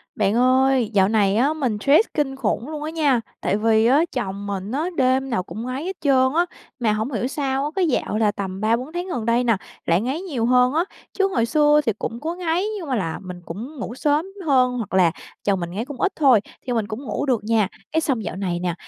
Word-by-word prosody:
Bạn 205 Hz, 0 st, +1 dB
ơi, 255 Hz, -1 st, +3 dB
dạo 190 Hz, -2 st, +4 dB
này 205 Hz, -3 st, +2 dB
á 275 Hz, +7 st, +3 dB
mình 255 Hz, -9 st, -1 dB
stress 295 Hz, -, +5 dB
kinh 280 Hz, -3 st, -1 dB
khủng 245 Hz, +1 st, -2 dB
luôn 305 Hz, -1 st, -5 dB
á 310 Hz, -, -3 dB
nha, 290 Hz, -7 st, +2 dB, 0.2 s
tại 200 Hz, -, +1 dB
vì 220 Hz, 0 st, +3 dB
á 275 Hz, +7 st, +5 dB
chồng 200 Hz, -4 st, -3 dB
mình 200 Hz, 0 st, -4 dB
á 290 Hz, +5 st, -1 dB
đêm 260 Hz, +1 st, +2 dB
nào 205 Hz, -7 st, 0 dB
cũng 220 Hz, +5 st, -7 dB
ngáy 255 Hz, +3 st, -4 dB
hết 380 Hz, +1 st, -3 dB
trơn 260 Hz, -2 st, +3 dB
á. 345 Hz, +1 st, +4 dB, 0.3 s
Mà 225 Hz, -3 st, +2 dB
hổng 220 Hz, +5 st, -2 dB
hiểu 240 Hz, 0 st, -1 dB
sao 270 Hz, -1 st, -1 dB
á, -, -, -1 dB
cái 375 Hz, -3 st, +2 dB
dạo 245 Hz, -6 st, 0 dB
là 215 Hz, -2 st, +3 dB
tầm 195 Hz, -1 st, -5 dB
3-4 235 Hz, +7 st, 0 dB
tháng 350 Hz, +1 st, -3 dB
gần 240 Hz, -10 st, -3 dB
đây 235 Hz, +2 st, +2 dB
nè 230 Hz, -4 st, +2 dB, 0.3 s
lại 170 Hz, +3 st, +2 dB
ngáy 265 Hz, +8 st, -2 dB
nhiều 280 Hz, -12 st, -2 dB
hơn 250 Hz, +1 st, +4 dB
á, 325 Hz, +3 st, +2 dB, 0.3 s
chứ 390 Hz, -1 st, +2 dB
hồi 235 Hz, -12 st, +1 dB
xưa 295 Hz, +4 st, +4 dB
thì 225 Hz, -, +2 dB
cũng 230 Hz, -, -4 dB
có 325 Hz, +5 st, -3 dB
ngáy 350 Hz, +1 st, 0 dB
nhưng 345 Hz, -6 st, -6 dB
mà 260 Hz, -, +1 dB
là 165 Hz, -7 st, -2 dB
mình 180 Hz, -1 st, -8 dB
cũng 225 Hz, -, -7 dB
ngủ 235 Hz, -, -5 dB
sớm 295 Hz, +4 st, +1 dB, 0.2 s
hơn 255 Hz, -4 st, +3 dB
hoặc 220 Hz, -5 st, -5 dB
là 180 Hz, -3 st, +4 dB, 0.3 s
chồng 200 Hz, -2 st, +1 dB
mình 170 Hz, -1 st, -4 dB
ngáy 215 Hz, +6 st, -3 dB
cũng 285 Hz, -2 st, -8 dB
ít 400 Hz, -, +2 dB
thôi 270 Hz, -7 st, +5 dB, 0.3 s
thì 250 Hz, -, 0 dB
mình 225 Hz, -3 st, 0 dB
cũng 220 Hz, +5 st, -6 dB
ngủ 285 Hz, -, -2 dB
được 245 Hz, -6 st, 0 dB
nha. 220 Hz, -2 st, +2 dB, 0.2 s
Cái 320 Hz, -, +1 dB
xong 260 Hz, -8 st, -1 dB
dạo -, -, -4 dB
này 185 Hz, -3 st, -2 dB
nè, 175 Hz, -1 st, -1 dB
250 Hz, 250 wpm, -22 LUFS, 215-290 Hz, 0.3 s, stress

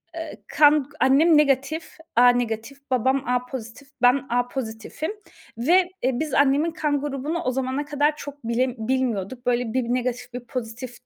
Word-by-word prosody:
eee, 325 Hz, -1 st, -7 dB
kan 295 Hz, -2 st, +4 dB
Annem 300 Hz, +5 st, +5 dB
negatif, 295 Hz, +3 st, +1 dB, 0.2 s
A 245 Hz, +1 st, +7 dB
negatif, 240 Hz, +1 st, -1 dB
babam 260 Hz, +2 st, +2 dB
A 250 Hz, 0 st, +1 dB
pozitif, 250 Hz, +1 st, -8 dB
ben 250 Hz, +2 st, +4 dB
A 245 Hz, +1 st, +1 dB
pozitifim 245 Hz, -, -5 dB, 0.5 s
ve, 350 Hz, +9 st, +3 dB
eee, 260 Hz, -, +3 dB
biz 310 Hz, -3 st, -3 dB
annemin 285 Hz, +4 st, +3 dB
kan 295 Hz, -3 st, -1 dB
grubunu 290 Hz, +3 st, -3 dB
o 255 Hz, -, 0 dB
zamana 265 Hz, +2 st, -2 dB
kadar 295 Hz, +1 st, +1 dB
çok 285 Hz, -1 st, -9 dB
bile 240 Hz, +2 st, 0 dB
bilmiyorduk. 240 Hz, -1 st, -2 dB
Böyle, 240 Hz, -2 st, 0 dB
bir 260 Hz, 0 st, +1 dB
negatif, 245 Hz, 0 st, -2 dB
bir 245 Hz, -, -4 dB
pozitif 245 Hz, +1 st, -6 dB
260 Hz, 155 wpm, -24 LUFS, 245-290 Hz, 0.5 s, A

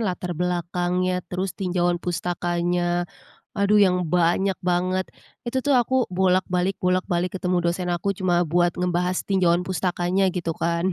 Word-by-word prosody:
latar 180 Hz, -4 st, -2 dB
belakangnya, 180 Hz, +1 st, -1 dB
terus 185 Hz, +1 st, -3 dB
tinjauan 175 Hz, -2 st, -1 dB
pustakannya. 175 Hz, 0 st, -1 dB, 0.5 s
Aduh 200 Hz, +1 st, +3 dB
yang 180 Hz, -3 st, +3 dB
banyak 180 Hz, +3 st, +2 dB
banget, 185 Hz, +1 st, 0 dB, 0.3 s
itu 240 Hz, +2 st, -1 dB
tuh 285 Hz, 0 st, +1 dB
aku 255 Hz, +1 st, +2 dB
bolak 185 Hz, 0 st, +2 dB
balik 180 Hz, +1 st, 0 dB
bolak 185 Hz, 0 st, +2 dB
balik 180 Hz, +1 st, -1 dB
ketemu 180 Hz, -1 st, 0 dB
dosen 180 Hz, +1 st, -2 dB
aku, 195 Hz, +3 st, -1 dB
cuma 175 Hz, -2 st, +1 dB
buat 175 Hz, +1 st, +3 dB
ngebahas 180 Hz, 0 st, 0 dB
tinjauan 180 Hz, -3 st, +3 dB
pustakannya 185 Hz, +1 st, 0 dB
gitu 170 Hz, -2 st, -3 dB
kan. 170 Hz, +2 st, 0 dB
180 Hz, 145 wpm, -23 LUFS, 175-185 Hz, 0.5 s, Aduh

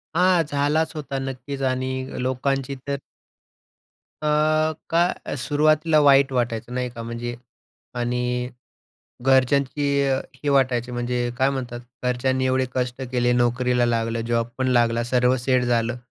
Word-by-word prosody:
हां, 180 Hz, -1 st, +4 dB
झालाच 145 Hz, +2 st, +1 dB
होता 140 Hz, -3 st, -4 dB
नक्कीच 135 Hz, +1 st, -5 dB
आणि 130 Hz, 0 st, -2 dB, 0.3 s
लोकांची 135 Hz, +1 st, -1 dB
तर 140 Hz, -, -1 dB, 1.3 s
अ, -, -, 0 dB, 0.6 s
काय 170 Hz, -1 st, 0 dB
सुरुवातीला 155 Hz, +3 st, +2 dB
वाईट 140 Hz, -1 st, +5 dB
वाटायचं 120 Hz, -1 st, -2 dB
नाही 125 Hz, 0 st, -2 dB
का? 120 Hz, -1 st, -9 dB
म्हणजे 115 Hz, +1 st, -5 dB, 0.6 s
आणि 125 Hz, +1 st, -1 dB, 0.7 s
घरच्यांची 135 Hz, +2 st, +2 dB, 0.6 s
ही 145 Hz, -, -2 dB
वाटायची 130 Hz, -3 st, +2 dB
म्हणजे 120 Hz, 0 st, -1 dB
काय 135 Hz, +1 st, +3 dB
म्हणतात 125 Hz, -3 st, -4 dB, 0.2 s
घरच्यांनी 130 Hz, +1 st, +1 dB
एवढे 130 Hz, 0 st, +2 dB
कष्ट 125 Hz, 0 st, -2 dB
केले, 125 Hz, 0 st, +2 dB
नोकरीला 125 Hz, 0 st, +2 dB
लागलं, 115 Hz, 0 st, 0 dB
जॉब 115 Hz, 0 st, 0 dB
पण 130 Hz, 0 st, +1 dB
लागला, 120 Hz, -2 st, +2 dB
सर्व 125 Hz, +1 st, +2 dB
सेट 125 Hz, 0 st, +1 dB
झालं 120 Hz, 0 st, 0 dB
125 Hz, 125 wpm, -23 LUFS, 120-140 Hz, 1.3 s, वाईट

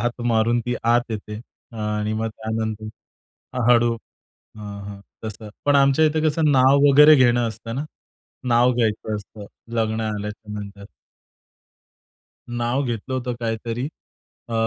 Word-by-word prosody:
लात 120 Hz, 0 st, -2 dB
मारून 115 Hz, +2 st, +2 dB
ती 120 Hz, -, 0 dB
आत 120 Hz, +1 st, +2 dB
येते. 105 Hz, 0 st, -5 dB, 0.3 s
आ, 115 Hz, -, -9 dB, 0.2 s
आणि 105 Hz, +1 st, -1 dB
मग 110 Hz, +1 st, -1 dB
त्यानंतर 110 Hz, 0 st, -4 dB, 0.8 s
हळू 120 Hz, -1 st, +5 dB, 0.6 s
हं, 105 Hz, -1 st, -7 dB
हं. 100 Hz, -1 st, -9 dB, 0.2 s
तसं 110 Hz, 0 st, -7 dB, 0.2 s
पण 145 Hz, 0 st, +4 dB
आमच्या 140 Hz, +3 st, +4 dB
इथे 155 Hz, 0 st, +1 dB
कसं 155 Hz, 0 st, +2 dB
नाव 135 Hz, +1 st, +5 dB
वगैरे 150 Hz, +2 st, +8 dB
घेणं 120 Hz, -3 st, +3 dB
असतं 115 Hz, +1 st, -6 dB
ना. 145 Hz, +3 st, -3 dB, 0.6 s
नाव 120 Hz, +1 st, +4 dB
घ्यायचं 110 Hz, -2 st, -1 dB
असतं 105 Hz, 0 st, -9 dB, 0.3 s
लग्न 110 Hz, 0 st, 0 dB
झाल्याच्यानंतर. 105 Hz, -1 st, -7 dB, 1.6 s
नाव 120 Hz, +3 st, -1 dB
घेतलं 120 Hz, +2 st, -4 dB
होतं 125 Hz, -1 st, -2 dB
काहीतरी 115 Hz, +2 st, -3 dB, 0.6 s
अ, -, -, -4 dB
115 Hz, 130 wpm, -22 LUFS, 110-125 Hz, 1.6 s, वगैरे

